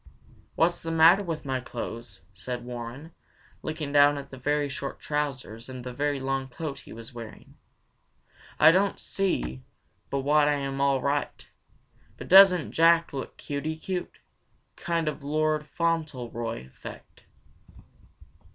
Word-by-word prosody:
"What's 175 +1 +2
the 165 - -5
matter 165 +5 +6
with 165 -4 -4
my 130 -1 -1
clothes?" 115 -4 -7
said 120 +6 -6
Warren, 125 +6 -7 0.5
looking 155 -2 -4
down 145 0 +5
at 140 - -8
the 135 - -9
very 145 +2 0
short 140 0 -5
trousers 135 -6 -3
and 130 -1 -7
very 140 +3 -1
long 135 0 -2
coat 140 +2 -6
he - - -14
was 115 +2 -10
wearing. 115 -2 -10 1.1
"I 155 - +9
don't 195 +3 +1
see 65 - -2 0.5
but 140 - -1
what 145 +2 +4
I 150 - +3
am 135 -1 -3
all 140 -2 +2
right, 145 +1 -2 0.7
but - - -8
doesn't 185 -3 +7
Jack 165 0 +4
look 135 -2 -6
cuty 150 +2 -4
cute? 180 +1 -4 0.6
Kind 170 -3 -1
of 150 - -3
Lord 155 +1 0
Fauntleroy 125 - -2
effect!" 65 - -12
145 Hz, 135 wpm, -27 LUFS, 125-160 Hz, 1.1 s, I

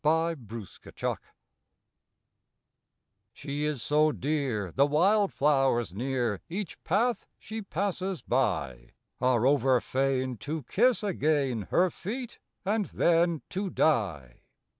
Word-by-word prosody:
INDIFFERENCE 150 - -2 2.1
She 145 +2 -4
is 150 -6 -2
so 155 +1 +3
dear 125 - -2
the 140 +2 +4
wildflowers 145 - +2
near 120 -2 -1
Each 185 +1 -5
path 230 +7 +1
she 220 0 -6
passes 190 -1 -3
by, - - -1 0.3
Are 125 -2 +2
over 135 -2 +4
fain 130 -1 -1
to 150 +5 -4
kiss 235 - +2
again 145 - 0
Her 180 0 +3
feet 240 +9 -6 0.3
and 210 +1 +1
then 170 -2 +2
to 195 +1 -2
die. 90 - 0
150 Hz, 100 wpm, -28 LUFS, 125-180 Hz, 2.1 s, the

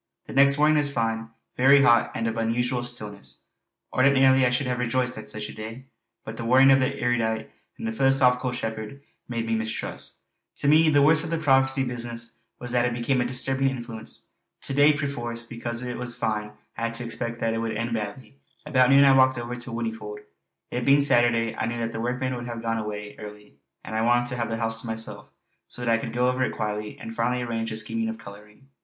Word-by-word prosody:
The - - -9
next 140 +1 +5
morning 150 +1 +4
was 145 -1 +1
fine, 115 -2 -2 0.3
very 140 +2 +6
hot, 120 -4 +4
and 115 - -2
of 115 0 -1
an 115 0 -1
unusual 120 +1 0
stillness. 105 -5 -6 0.5
Ordinarily 130 -1 +5
I - - +2
should 125 +3 0
have 125 -1 -2
rejoiced 125 +1 0
at 110 - -8
such 105 -1 -4
a - - -9
day; 115 +5 -9 0.4
but 110 +1 -7
the 115 - -5
warning 130 +3 +6
of 135 - +6
the 135 +1 -1
erudite 110 -2 -1 0.3
and 110 0 -4
philosophical 130 -1 +3
shepherd 110 +2 -5 0.3
made 115 -1 -2
me 115 - -1
mistrust. 110 0 -4 0.4
To - - -2
me 155 +2 +6
the 145 -2 +4
worst 150 +1 +6
of 165 - -3
the 165 - 0
prophecy 135 -3 +3
business 120 -1 -5 0.2
was 125 0 -5
that 120 -1 +2
it 120 -1 -1
became 125 +2 0
a - - 0
disturbing 135 +2 0
influence. 120 -4 -7 0.3
To - - -3
day, 145 +2 +6
perforce, 120 -5 -3
because 120 0 -5
it 125 -1 -5
was 120 -1 -3
fine, 105 -3 -2 0.2
I 115 - -1
had 115 0 -3
to 120 +1 -2
expect 115 0 -4
that 115 0 0
it 115 - -2
would 115 -1 -2
end 115 +1 -2
badly. 110 +4 -6 0.3
About 130 -4 +3
noon 140 +1 +7
I 135 -1 +6
walked 130 -1 +4
over 120 +1 -4
to 120 +1 -7
Whinnyfold; 110 -3 -5 0.5
it 125 - -2
being 140 +3 +5
Saturday 120 -4 +2
I 110 - -2
knew 120 0 -3
that 115 -1 -2
the 115 - -5
workmen 125 +2 -2
would 120 0 -6
have 115 -1 -6
gone 115 0 -1
away 105 -1 -6
early, 105 -6 -11 0.3
and - - -8
I 110 - 0
wanted 120 +1 +3
to 125 - -3
have 120 -1 -2
the 115 - -2
house 115 0 -1
to 120 - -8
myself 110 0 -4 0.4
so 125 - -6
that 115 - +2
I 115 - +2
could 115 - -5
go 125 +1 +1
over 125 +1 +1
it - - -1
quietly 105 -1 -4
and 115 - -8
finally 125 +2 0
arrange 115 -1 -3
the 110 - -4
scheme 225 - -1
of 225 - -5
colouring. 105 - -14
120 Hz, 225 wpm, -25 LUFS, 115-130 Hz, 0.5 s, noon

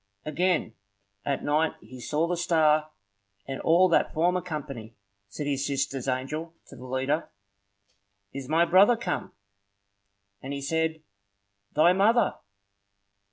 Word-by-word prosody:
Again 165 -4 0 0.5
at 140 +4 -2
night 155 +2 +1
he 130 - -12
saw 150 +6 0
the 175 +1 -1
star, 155 -3 +2 0.6
and 135 -1 -5
all 175 +3 +5
that 165 - +2
former 175 +3 +2
company. 140 -10 -7 0.3
Said 120 +9 -6
his 140 -1 -1
sister's 135 -2 -2
angel 150 +6 -3
to - - -12
the 125 0 -11
leader,— 130 +5 -1 1.0
"Is 135 -1 -7
my 165 +2 +4
brother 200 +7 +5
come?" 235 - -3 1.1
And 135 +2 -5
he 140 - -4
said, 160 +2 -1 0.7
"Thy 165 +4 +5
mother!" 220 +5 +3
155 Hz, 125 wpm, -27 LUFS, 135-170 Hz, 1.1 s, all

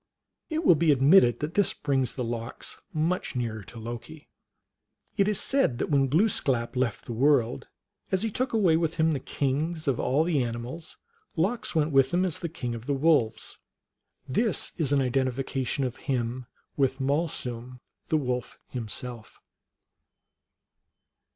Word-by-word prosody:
It 320 0 -2
will - - +8
be 160 0 +3
admitted 135 - +5
that 150 +2 -3
this 205 -1 +2
brings 135 -3 0
the 125 - -2
Lox 115 0 -5
much 165 -1 -1
nearer 115 -3 -2
to 120 - -11
Loki. 120 +7 -8 0.9
It 200 -1 +3
is 210 -2 +1
said 270 - +2
that - - -2
when 135 -2 +4
Glooskap 135 - +1
]eft 125 -5 -1
the 120 - -5
world, 125 - +2 0.4
as 190 +2 +1
he 225 - -1
took 255 +5 -1
away 190 -8 +4
with 165 -1 0
him 160 0 +3
the 145 - 0
kings 150 +5 -2
of 130 -3 +1
all 135 +5 +2
the 160 -6 +1
animals, 120 +7 -6 0.4
Lox 195 +5 -1
went 155 -1 +2
with 135 -1 +4
him 180 +1 +3
as 180 - -2
king 125 -7 -4
of 115 0 -8
the 140 - +1
Wolves. 135 -7 +1 0.7
This 215 - 0
is 150 -5 -1
an 140 -1 +4
identification 130 +1 -1
of 125 -2 -3
him 125 -3 -2 0.3
with 135 -1 +1
Malsum, 125 -4 -2 0.3
the 155 - +2
Wolf, 125 -4 -3
himself. 120 -1 -6
135 Hz, 150 wpm, -27 LUFS, 125-160 Hz, 0.9 s, will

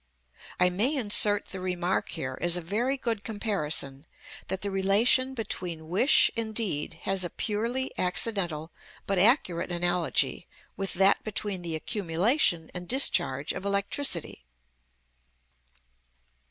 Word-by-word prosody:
I 180 0 +4
may 230 +12 +1
insert 205 -4 +4
the 190 - -7
remark 180 0 -2
here, 130 0 -5
as 175 0 +4
a - - -4
very 230 +11 -1
good 230 -5 -3
comparison, 160 -10 -1 0.4
that 190 +1 -4
the 200 - -1
relation 220 +7 +2
between 180 -8 -4
wish 205 - +4
and 220 -1 -4
deed 165 -7 -1
has 195 -1 0
a 175 - -2
purely 235 +7 -2
accidental 180 -4 -1 0.3
but 195 -2 0
accurate 185 - +3
analogy 175 0 0 0.3
with 195 -1 -3
that 195 +2 +4
between 205 -3 -3
the 170 -2 -4
accumulation 175 - 0
and 180 0 -6
discharge 175 - +1
of - - -7
electricity. 200 - 0
195 Hz, 125 wpm, -27 LUFS, 175-220 Hz, 0.4 s, I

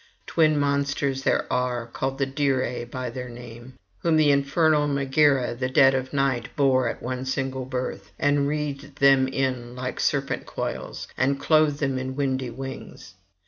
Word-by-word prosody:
Twin 155 -2 +3
monsters 140 -1 0
there - - +1
are, 125 -1 -1
called 130 +3 -3
the 135 - +1
Dirae 135 -3 -1
by 125 -1 -4
their 125 +1 -6
name, 120 +1 -11 0.2
whom 165 -2 +2
with 155 -1 +4
infernal 145 +2 +3
Megaera 140 -2 +2
the 130 +2 -3
dead 135 +1 +5
of 130 0 -2
night 135 -4 0
bore 130 -4 +3
at - - -7
one 130 +1 -3
single 130 0 -2
birth, 125 -6 -5
and 145 -1 +2
wreathed 145 -1 -4
them 135 -2 +5
in 130 -2 -2
like 125 0 -5
serpent 140 -2 -1
coils, - - -5
and 135 +2 +2
clothed 155 -1 +3
them 135 -2 0
in 130 0 -4
windy 130 -2 -1
wings. 135 +3 -8
135 Hz, 160 wpm, -25 LUFS, 130-140 Hz, 0.2 s, dead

